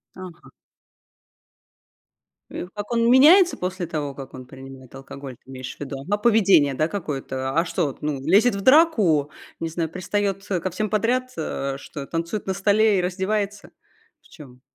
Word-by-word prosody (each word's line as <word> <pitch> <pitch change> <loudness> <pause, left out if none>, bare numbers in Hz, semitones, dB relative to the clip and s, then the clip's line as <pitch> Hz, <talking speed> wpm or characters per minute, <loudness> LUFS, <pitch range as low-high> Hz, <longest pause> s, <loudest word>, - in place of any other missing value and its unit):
Ага. 180 -3 -11 2.0
Э, 180 - -6
как 205 +2 -7
он 230 0 +2
меняется 340 +8 +6
после 180 -1 -4
того, 150 -4 -4
как 135 -1 -10
он 130 -1 -9
принимает 135 0 -13
алкоголь, 135 0 -9
ты 130 - -22
имеешь 130 -1 -7
в - - -31
виду? 140 -1 -6
А, 205 - +2
поведение, 200 -10 +4
да, 155 +4 0
какое-то? 135 -8 -4
А 170 - +1
что 170 -2 -1
вот, 135 - -8
ну, 150 -2 -2
лезет 200 - +4
в 200 - -4
драку, 215 - +4 0.3
не 165 - -3
знаю, 165 0 -3
пристает, 195 +3 -2
э, 185 - 0
ко 185 - -3
всем 210 +4 -3
подряд, 245 +5 0
э, 140 -3 -3
что, 140 0 -8
танцует 170 +7 -4
на 190 - 0
столе 205 +1 +3
и - - +1
раздевается? 200 +3 -3 0.5
В - - -23
чём 130 -6 -14
180 Hz, 170 wpm, -23 LUFS, 140-205 Hz, 2.0 s, меняется